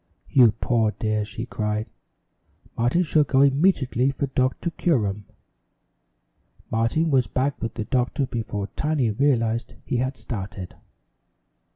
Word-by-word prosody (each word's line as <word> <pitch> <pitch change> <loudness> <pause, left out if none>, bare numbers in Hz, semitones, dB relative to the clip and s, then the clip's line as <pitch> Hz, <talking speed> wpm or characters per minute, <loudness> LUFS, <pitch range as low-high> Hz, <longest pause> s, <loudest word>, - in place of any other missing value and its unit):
"You 125 -5 +6
poor 115 -1 +1
dear!" 110 -1 0
she 105 +2 -6
cried. 105 -2 -3 0.8
"Martin 120 +10 +2
shall 155 -2 +3
go 135 -1 +2
immediately 140 -3 +3
for 140 +1 -2
Doctor 130 +5 -1
Curum." 105 - 0 1.5
Martin 115 +9 +1
was 130 -3 +3
back 135 +2 -1
with 115 0 -4
the 110 - -3
doctor 130 +2 0
before 110 -5 -4
Tiny 150 -7 0
realized 115 -2 0
he 125 - -1
had 130 +2 -1
started. 95 -5 -6
125 Hz, 120 wpm, -24 LUFS, 110-140 Hz, 1.5 s, You